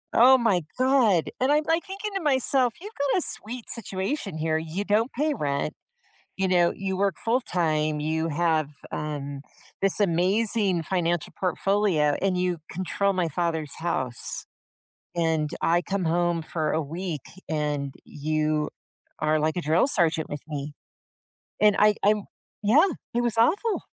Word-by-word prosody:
Oh 260 Hz, +3 st, +8 dB
my 225 Hz, -7 st, +2 dB, 0.2 s
god. 250 Hz, -, +3 dB
And 260 Hz, +3 st, +2 dB
I'm, 300 Hz, +1 st, +3 dB
like, 325 Hz, +3 st, 0 dB
thinking 405 Hz, +2 st, -5 dB
to 390 Hz, -, -1 dB
myself, 265 Hz, -4 st, +2 dB
"you've 415 Hz, +5 st, -9 dB
got 285 Hz, +2 st, 0 dB
a -, -, -2 dB
sweet 235 Hz, +2 st, -4 dB
situation 195 Hz, -, -3 dB
here. 160 Hz, 0 st, 0 dB
You 160 Hz, +5 st, -3 dB
don't 215 Hz, +5 st, +1 dB
pay 300 Hz, +4 st, 0 dB
rent, 145 Hz, -, -2 dB, 0.6 s
you 190 Hz, 0 st, 0 dB
know, 175 Hz, -2 st, +3 dB
you 190 Hz, -1 st, -3 dB
work 200 Hz, +1 st, +1 dB
full 235 Hz, +3 st, +2 dB
time, 155 Hz, -, 0 dB
you 160 Hz, +2 st, -1 dB
have, 160 Hz, -1 st, +1 dB, 0.2 s
um, 145 Hz, -2 st, -4 dB, 0.4 s
this 195 Hz, +1 st, +2 dB
amazing 195 Hz, +1 st, +2 dB
financial 175 Hz, -1 st, -1 dB
portfolio, 185 Hz, -5 st, +1 dB
and 190 Hz, -1 st, +1 dB
you 180 Hz, -1 st, 0 dB
control 185 Hz, +3 st, 0 dB
my 180 Hz, -3 st, 0 dB
father's 160 Hz, -2 st, -2 dB
house. 130 Hz, -8 st, -1 dB, 0.7 s
And 160 Hz, -3 st, +1 dB
I 170 Hz, +1 st, +3 dB
come 195 Hz, 0 st, -2 dB
home 170 Hz, 0 st, +1 dB
for 155 Hz, -1 st, -2 dB
a 160 Hz, -, 0 dB
week, 165 Hz, 0 st, -4 dB, 0.3 s
and 150 Hz, -3 st, -2 dB
you 155 Hz, 0 st, -1 dB, 0.5 s
are 155 Hz, 0 st, +2 dB
like 155 Hz, +2 st, 0 dB
a -, -, 0 dB
drill 160 Hz, -, +3 dB
sergeant 165 Hz, -, +3 dB
with 145 Hz, -, -5 dB
me." 145 Hz, -1 st, -5 dB, 0.9 s
And 210 Hz, -1 st, +5 dB
I 210 Hz, 0 st, +5 dB
I'm 210 Hz, 0 st, +3 dB, 0.4 s
Yeah, 275 Hz, -, +5 dB, 0.3 s
it 240 Hz, -, +2 dB
was 235 Hz, -2 st, 0 dB
awful. 390 Hz, -, +2 dB
180 Hz, 155 wpm, -26 LUFS, 155-220 Hz, 0.9 s, Oh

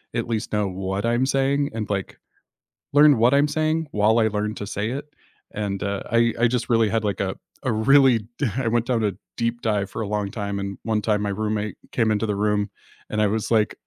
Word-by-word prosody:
at 115 Hz, 0 st, -1 dB
least 110 Hz, -2 st, -3 dB
know 105 Hz, -1 st, +1 dB
what 95 Hz, +2 st, -3 dB
I'm 120 Hz, +2 st, +2 dB
saying 140 Hz, +1 st, +1 dB
and 110 Hz, -2 st, -4 dB
like 95 Hz, -2 st, -3 dB, 0.8 s
learn 145 Hz, -2 st, +6 dB
what 120 Hz, +4 st, +4 dB
I'm 145 Hz, +1 st, +4 dB
saying 155 Hz, +1 st, 0 dB
while 105 Hz, +2 st, +3 dB
I 110 Hz, -1 st, +4 dB
learned 105 Hz, +1 st, -2 dB
to 100 Hz, -, -5 dB
say 105 Hz, +2 st, -2 dB
it, 135 Hz, +3 st, -4 dB, 0.5 s
and, 100 Hz, -2 st, -3 dB
uh, 100 Hz, 0 st, -2 dB
I 115 Hz, 0 st, +3 dB
I 120 Hz, -, +5 dB
just 120 Hz, 0 st, -1 dB
really 115 Hz, -2 st, +4 dB
had 115 Hz, 0 st, 0 dB
like 100 Hz, -1 st, -1 dB
a 95 Hz, -1 st, -1 dB, 0.3 s
a 130 Hz, -, +1 dB
really 125 Hz, +2 st, +5 dB, 0.2 s
d 145 Hz, -, +1 dB
I 125 Hz, -3 st, 0 dB
went 120 Hz, 0 st, +1 dB
down 120 Hz, -3 st, +1 dB
a 105 Hz, -, +1 dB, 0.2 s
deep 115 Hz, 0 st, -2 dB
dive 105 Hz, -3 st, 0 dB
for -, -, -5 dB
a 105 Hz, -, -3 dB
long 105 Hz, -1 st, -2 dB
time 100 Hz, -1 st, -3 dB
and 100 Hz, 0 st, -5 dB
one 110 Hz, -2 st, 0 dB
time 105 Hz, -1 st, +1 dB
my 105 Hz, -, -1 dB
roommate 105 Hz, 0 st, -2 dB, 0.2 s
came 115 Hz, -3 st, +2 dB
into 110 Hz, +1 st, +1 dB
the 105 Hz, -2 st, -1 dB
room, 105 Hz, 0 st, 0 dB, 0.4 s
and 110 Hz, -, -1 dB
I -, -, +4 dB
was 110 Hz, +1 st, -2 dB
like, 110 Hz, -2 st, +2 dB
110 Hz, 230 wpm, -23 LUFS, 105-120 Hz, 0.8 s, learn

